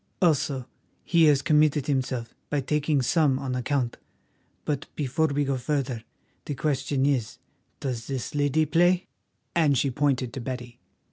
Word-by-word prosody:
Also, 145 -6 +2 0.4
he 170 -2 +4
has 145 -2 +4
committed 150 -2 +3
himself 130 -4 -1 0.2
by 145 - +1
taking 145 0 +1
some 145 -1 +3
on 135 -1 -3
account. 125 -1 -1 0.7
But 145 -3 -2
before 150 +2 +1
we 145 0 0
go 135 -1 0
further, 125 -3 -2 0.4
the 145 - -3
question 140 -1 0
is—does 125 -1 -4
this 135 -3 -4
lady 145 +2 +2
play?" 175 +4 +3 0.5
and 150 -5 +3
she 135 +2 +1
pointed 130 -3 0
to 135 - -5
Betty. 125 -1 -6
140 Hz, 140 wpm, -26 LUFS, 130-150 Hz, 0.7 s, he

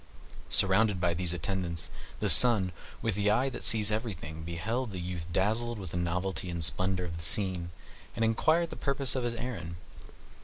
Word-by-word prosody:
Surrounded 100 0 +5
by 90 -1 0
these 85 0 -2
attendants, 85 -1 -4 0.3
the - - 0
Sun, 110 -7 +7 0.3
with 115 - 0
the 105 +1 0
eye 125 +6 +1
that 130 - -9
sees 110 -2 +3
everything, 100 -8 -5
beheld 100 +10 -4
the 95 - -6
youth 85 -1 -6
dazzled 110 +6 -1
with 95 -5 -7
the - - -7
novelty 90 +1 -3
and 85 -1 -4
splendor 95 +1 -1
of 85 -1 -7
the 80 - -6
scene, 90 -1 +3 0.5
and 115 -1 0
inquired 160 +9 +1
the - - -7
purpose 140 -2 0
of 130 - -2
his 120 -1 -2
errand. 110 -9 -6
95 Hz, 180 wpm, -29 LUFS, 85-115 Hz, 0.5 s, Sun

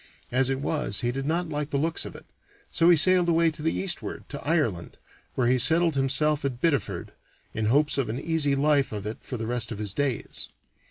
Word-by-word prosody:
As 130 +1 +2
it 135 0 -1
was, 145 -8 0
he 120 - 0
did 135 +2 -4
not 170 +2 -1
like 150 -1 -3
the 140 - -1
looks 160 +4 0
of - - -9
it, - - -11 0.5
so 170 0 +3
he 175 - +7
sailed 180 +2 +5
away 165 0 +3
to 155 - -5
the 160 +1 0
eastward, 190 -3 -2
to 140 - -7
Ireland, 140 - -1 0.4
where 125 - 0
he 125 +1 +2
settled 165 +6 +4
himself 140 +2 +1
at 130 -3 -3
Biddeford, 130 - -1 0.4
in 110 -1 -2
hopes 145 +4 +2
of 130 - -1
an 120 +4 -3
easy 155 -4 +1
life 145 0 +2
of 105 -2 -5
it 110 +1 -5
for 125 - -6
the 110 - -4
rest 120 0 -1
of 110 - -5
his 105 -2 -4
days. 135 -1 -1
140 Hz, 220 wpm, -26 LUFS, 120-160 Hz, 0.5 s, he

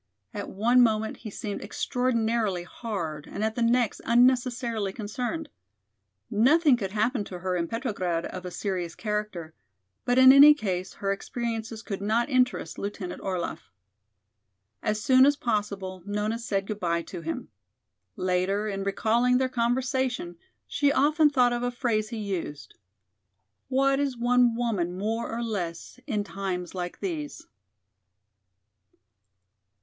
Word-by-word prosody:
At - - -5
one 235 +5 +3
moment 220 -2 +2
he 220 - -8
seemed 205 0 -5
extraordinarily 230 -6 0
hard 175 -7 -5
and 205 - -4
at 220 0 0
the 240 - -3
next 235 -1 +2
unnecessarily 240 -3 +2
concerned. 245 +9 -4 0.8
Nothing 285 +6 +5
could 200 -5 -3
happen 215 +3 0
to 185 - -7
her 185 +1 -2
in 170 -1 -1
Petrograd 195 -8 -2
of 185 - -6
a 180 - -5
serious 180 -2 -3
character, 210 -7 -4 0.5
but 245 0 +1
in 260 0 +9
any 290 +2 +9
case 190 -8 -3
her 195 -1 -2
experiences 225 +1 -4
could 195 -3 -5
not 225 +6 +1
interest 255 -1 +1
Lieutenant 200 -3 -5
Orlaff. 185 -3 -4 1.1
As 215 0 -1
soon 260 +4 +5
as 285 +2 +5
possible 200 -6 -2
Nona 210 +2 -1
said 200 -5 -2
good 210 0 -5
by 170 -2 0
to 175 0 -8
him. 165 0 -5 0.7
Later, 185 +3 0
in 195 -1 -3
recalling 230 +5 +2
their 260 0 +1
conversation, 250 -5 -1 0.3
she 285 -1 +2
often 300 +2 +4
thought 250 -4 +3
of 240 - -2
a 245 - 0
phrase 230 -4 -1
he 230 - -5
used: 180 -9 -5 0.9
"What 275 +1 +2
is 275 -3 -1
one 245 0 +3
woman 200 -7 -1
more 220 +4 -2
or 235 +1 -3
less 190 -2 -4
in 210 -2 -1
times 190 -3 -4
like 175 -1 -5
these?" 315 -6 -4
220 Hz, 140 wpm, -27 LUFS, 195-245 Hz, 1.1 s, in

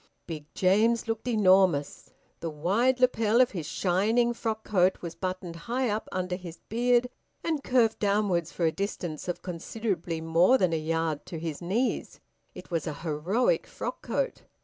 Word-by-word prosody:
Big 155 -2 -7
James 220 +6 +3
looked 225 +2 -3
enormous. 190 -9 +3 0.3
The 165 - -3
wide 200 +12 +1
lapel 230 -3 +3
of 255 - +5
his 170 -7 -5
shining 215 +8 +2
frock 220 -2 -3
coat 185 -2 +2
was 170 -1 -4
buttoned 185 -2 -4
high 250 0 +1
up 215 +1 -3
under 185 0 -2
his 175 -3 -9
beard 245 +2 +3 0.4
and 315 -4 -1
curved 240 -3 +2
downwards 200 -5 +1
for 170 - -1
a 160 - +3
distance 175 -5 -4
of 175 - -4
considerably 180 -1 -3
more 165 +9 +4
than 180 -7 +2
a 160 - +1
yard 160 -1 -2
to 165 - -6
his 160 -1 -5
knees: 210 +9 -1 0.4
it - - -11
was 165 -1 -1
a 155 - -3
heroic 180 - +1
frock - - -5
coat. - - -2
185 Hz, 165 wpm, -28 LUFS, 165-230 Hz, 0.4 s, of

